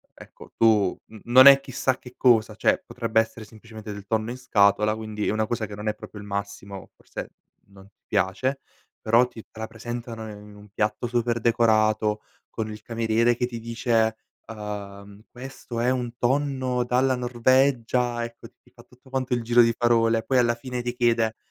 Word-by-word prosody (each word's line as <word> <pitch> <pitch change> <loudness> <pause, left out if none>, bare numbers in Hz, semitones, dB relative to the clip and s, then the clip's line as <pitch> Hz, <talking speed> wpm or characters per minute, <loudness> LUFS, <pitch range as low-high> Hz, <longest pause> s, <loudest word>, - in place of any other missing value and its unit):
ecco - - -15
tu 105 -5 +3
n 110 -2 -14
non 130 +3 +8
è 140 0 +10
chissà 130 -1 -2
che 125 - -14
cosa, 115 -4 +3
cioè - - +1
potrebbe 115 -2 0
essere 110 0 -3
semplicemente 110 0 -11
del 100 -1 -10
tonno 110 +2 -1
in 125 - -5
scatola, 105 -3 +2
quindi 110 -1 -4
è - - +1
una 110 0 0
cosa 115 -1 -2
che 105 - -10
non 105 +1 -7
è 105 - 0
proprio 105 - -11
il 100 - -10
massimo 100 -1 -6
forse - - -9 0.4
non 100 0 -16
ti 100 - -33
piace 130 +9 -1 0.4
però 115 +3 +4
ti 120 -2 -11
te - - -14
la 110 - -3
presentano 115 0 -7
in 105 0 -11
un 105 0 -15
piatto 105 +4 -2
super 120 0 0
decorato 110 -2 +2 0.3
con 110 -1 -4
il 105 0 -9
cameriere 115 +1 +1
che 125 +1 -1
ti 120 -2 -7
dice: 115 -1 0 0.3
"Uhm, 100 -1 -8
questo 125 -2 -8
è 120 +2 +2
un 125 -2 -2
tonno 130 -1 0
dalla 130 +2 +2
Norvegia" 125 -1 +1
ecco 115 0 -9
ti - - -45
ti - - -25
fa - - -18
tutto 125 +1 -22
quanto 130 -1 -2
il 120 - 0
giro 120 +1 +4
di 115 0 +1
parole 115 -1 +2
poi 130 +3 +1
alla 120 -1 +3
fine 125 +1 -6
ti 120 0 -3
chiede: 115 -2 +1
115 Hz, 190 wpm, -24 LUFS, 110-125 Hz, 0.4 s, è